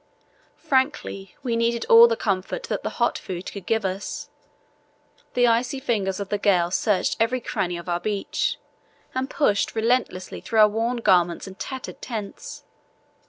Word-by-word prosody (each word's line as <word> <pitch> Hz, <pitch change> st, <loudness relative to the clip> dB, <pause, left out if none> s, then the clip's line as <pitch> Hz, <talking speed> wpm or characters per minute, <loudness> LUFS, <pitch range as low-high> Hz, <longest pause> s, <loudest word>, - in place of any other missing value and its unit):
Frankly, 260 Hz, -8 st, -1 dB
we 240 Hz, -3 st, 0 dB
needed 230 Hz, 0 st, 0 dB
all 230 Hz, +1 st, +9 dB
the 230 Hz, -, +1 dB
comfort 195 Hz, -, -2 dB
that -, -, -3 dB
the -, -, -2 dB
hot -, -, +1 dB
food 185 Hz, 0 st, -6 dB
could 195 Hz, -3 st, -9 dB
give 225 Hz, -2 st, +1 dB
us. 190 Hz, +2 st, -4 dB, 1.0 s
The 245 Hz, 0 st, +4 dB
icy 240 Hz, +3 st, +1 dB
fingers 205 Hz, -8 st, -1 dB
of 200 Hz, -1 st, -5 dB
the 205 Hz, -, -1 dB
gale 180 Hz, -4 st, +3 dB
searched 200 Hz, +1 st, +1 dB
every 235 Hz, +3 st, +2 dB
cranny 180 Hz, -6 st, -2 dB
of 170 Hz, -, -9 dB
our 175 Hz, 0 st, 0 dB
beach 200 Hz, +2 st, -1 dB, 0.6 s
and 260 Hz, +1 st, -2 dB
pushed 210 Hz, -11 st, +1 dB
relentlessly 225 Hz, -5 st, 0 dB
through 225 Hz, -2 st, +2 dB
our 210 Hz, -, +8 dB
worn 230 Hz, +3 st, -1 dB
garments 175 Hz, -5 st, +3 dB
and 190 Hz, 0 st, -11 dB
tattered 265 Hz, 0 st, -6 dB
tents. 215 Hz, -5 st, -6 dB
215 Hz, 160 wpm, -24 LUFS, 190-235 Hz, 1.0 s, all